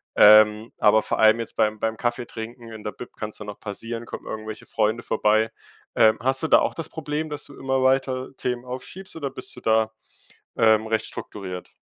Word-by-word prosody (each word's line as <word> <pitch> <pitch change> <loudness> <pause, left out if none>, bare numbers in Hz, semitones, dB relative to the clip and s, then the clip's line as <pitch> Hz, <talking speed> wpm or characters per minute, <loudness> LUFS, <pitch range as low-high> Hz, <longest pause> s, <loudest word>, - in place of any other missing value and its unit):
Ähm, 105 +1 +7
aber 110 -1 +5
vor - - -2
allem 110 +1 +6
jetzt 115 - -5
beim 110 0 +1
beim 110 0 -1
Kaffeetrinken 120 -1 -4
in 110 -1 -9
der 105 - -3
Bib 125 - -10
kann's 105 0 -5
dann 105 -1 -8
auch 105 - -9
passieren, 115 +3 -6
kommen - - -8
irgendwelche 110 0 -6
Freunde 110 +1 0
vorbei. 110 0 +2 0.5
Ähm, 110 0 +5
hast 130 +4 +1
du - - +1
da - - +7
auch - - -1
das 165 - -4
Problem, 155 0 -4
dass 150 0 -6
du 145 - -13
immer 135 0 0
weiter 130 0 +1
Themen 125 -1 -2
aufschiebst, 130 +10 -8
oder 145 -4 -4
bist 130 - -8
du - - -11
da, 110 0 +2 0.6
ähm, 110 -1 +4
recht 110 0 0
strukturiert? 90 -3 -7
115 Hz, 195 wpm, -24 LUFS, 110-130 Hz, 0.6 s, Ähm